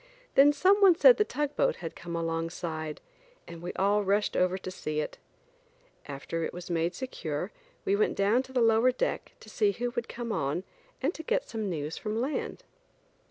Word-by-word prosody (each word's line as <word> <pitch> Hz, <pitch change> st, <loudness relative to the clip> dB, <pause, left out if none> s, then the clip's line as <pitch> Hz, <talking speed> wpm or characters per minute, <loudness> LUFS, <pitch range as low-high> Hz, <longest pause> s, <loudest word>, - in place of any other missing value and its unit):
Then 280 Hz, +2 st, +7 dB
some 375 Hz, +7 st, +4 dB
one 380 Hz, -3 st, +8 dB
said -, -, +7 dB
the 425 Hz, -, +4 dB
tugboat 295 Hz, -5 st, 0 dB
had 165 Hz, -2 st, -7 dB
come 170 Hz, 0 st, -6 dB
alongside, 165 Hz, -1 st, -3 dB, 0.5 s
and 170 Hz, -1 st, -9 dB
we 175 Hz, -, -4 dB
all 205 Hz, +2 st, +2 dB
rushed 200 Hz, +2 st, +1 dB
over 185 Hz, +1 st, +2 dB
to 185 Hz, -1 st, -6 dB
see 155 Hz, -4 st, -3 dB
it. 150 Hz, -, -4 dB, 0.9 s
After 145 Hz, +4 st, -4 dB
it -, -, -3 dB
was 175 Hz, 0 st, -7 dB
made 170 Hz, +1 st, 0 dB
secure 260 Hz, -1 st, -4 dB, 0.3 s
we 400 Hz, 0 st, +3 dB
went 430 Hz, +1 st, +1 dB
down 205 Hz, +5 st, +3 dB
to 260 Hz, -, -12 dB
the 255 Hz, -2 st, +1 dB
lower 225 Hz, +2 st, +5 dB
deck 255 Hz, -, -2 dB
to -, -, -14 dB
see 410 Hz, -2 st, +1 dB
who 245 Hz, 0 st, -2 dB
would 240 Hz, -1 st, -4 dB
come 235 Hz, -1 st, -5 dB
on 145 Hz, +1 st, -1 dB, 0.4 s
and 295 Hz, +6 st, +1 dB
to -, -, -7 dB
get -, -, -1 dB
some 220 Hz, -3 st, -3 dB
news 155 Hz, -2 st, -3 dB
from 215 Hz, 0 st, -2 dB
land. 270 Hz, +5 st, -3 dB
210 Hz, 190 wpm, -29 LUFS, 170-265 Hz, 0.9 s, one